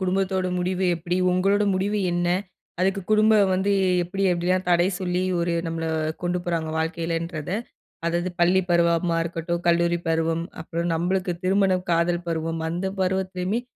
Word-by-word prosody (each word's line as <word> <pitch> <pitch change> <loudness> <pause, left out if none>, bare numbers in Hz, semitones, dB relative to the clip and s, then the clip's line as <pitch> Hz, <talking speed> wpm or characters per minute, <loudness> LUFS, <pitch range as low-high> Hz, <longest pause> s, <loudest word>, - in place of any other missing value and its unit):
குடும்பத்தோட 190 0 0
முடிவு 185 +1 -1
எப்டி, 175 +2 -2
உங்களோட 195 +3 +2
முடிவு 205 +3 0
என்ன. 175 0 0 0.5
அதுக்கு 195 +1 +1
குடும்பம் 215 -2 +5
வந்து 195 +2 +1 0.3
எப்டி 195 +3 -4
எப்டிலாம் 180 +1 0
தடை 175 +1 +4
சொல்லி, 180 0 -1 0.2
ஒரு 170 0 0
நம்மள 165 0 -3 0.4
கொண்டு 175 0 0
போறாங்க 165 -2 -1
வாழ்க்கையிலன்றத. 165 -1 -3 0.6
அதாவது 175 +2 0
பள்ளி 180 +2 +4
பருவமா 170 0 +2
இருக்கட்டும், 170 0 -3
கல்லூரி 170 0 +3
பருவம், 165 +1 0 0.2
அப்புறம் 170 +1 -3
நம்மளுக்கு 180 +2 0
திருமணம், 190 -1 +2
காதல் 170 +1 +1
பருவம் 165 0 -2
அந்த 175 +3 -2
பருவத்திலுமே 185 +3 -1
175 Hz, 135 wpm, -24 LUFS, 170-190 Hz, 0.6 s, குடும்பம்